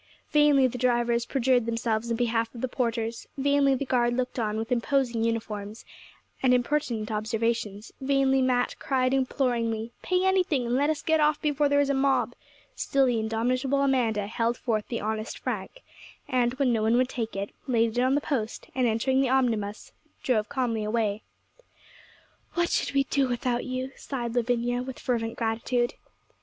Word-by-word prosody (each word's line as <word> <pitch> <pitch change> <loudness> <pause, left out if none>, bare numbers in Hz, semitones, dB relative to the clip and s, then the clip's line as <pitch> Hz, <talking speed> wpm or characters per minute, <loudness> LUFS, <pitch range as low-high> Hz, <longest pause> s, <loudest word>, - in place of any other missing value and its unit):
Vainly 295 -3 +5
the 250 -1 -2
drivers 240 -1 +1
perjured 250 -3 +2
themselves 230 0 -1
in 230 - 0
behalf 230 -1 0
of 235 - -7
the 260 - 0
porters; 230 -2 -2
vainly 280 0 +3
the 280 - -3
guard 240 -2 +1
looked 255 0 -2
on, 215 -1 -1
with 225 +2 -4
imposing 245 -1 +1
uniforms, 220 -2 -3 0.6
and 250 -1 +4
impertinent 245 -4 -1
observations; 220 0 -2
vainly 270 0 +2
Mat 250 -1 +1
cried 255 -1 +1
imploringly, 240 -4 0
'Pay 365 0 +1
anything, 365 -9 +2
and 235 - -1
let 285 +4 +2
us 310 -1 -1
get 320 0 +2
off 300 0 +3
before 295 -1 +1
there 285 0 +3
is 285 -1 +2
a - - +1
mob' 270 0 +1 0.4
still 275 -1 +2
the 245 -3 +1
indomitable 255 +5 0
Amanda 235 -7 +1
held 230 +3 -1
forth 215 -3 -1
the 235 - -3
honest 215 +1 -3
franc; - - -5 0.4
and, 250 -1 +1
when 260 -3 +2
no 225 - +1
one 225 +2 +3
would 255 0 +3
take 230 -4 -4
it, 200 +1 -3 0.2
laid 230 -3 +2
it 245 - +2
on 260 +2 +3
the 290 - +1
post, 240 -7 -3
and 255 -1 +2
entering 260 +4 +2
the 265 - +1
omnibus, 225 -6 0 0.3
drove 215 -5 +1
calmly 235 -5 -1
away. 215 -1 0 1.3
'What 345 0 +1
should - - 0
we 275 - +4
do 275 0 +1
without 245 0 -1
you?' 255 +1 -3
sighed 240 -4 -4
Lavinia, 245 0 0
with 260 0 -6
fervent 230 -3 -2
gratitude. 235 +2 0
245 Hz, 175 wpm, -27 LUFS, 225-265 Hz, 1.3 s, Vainly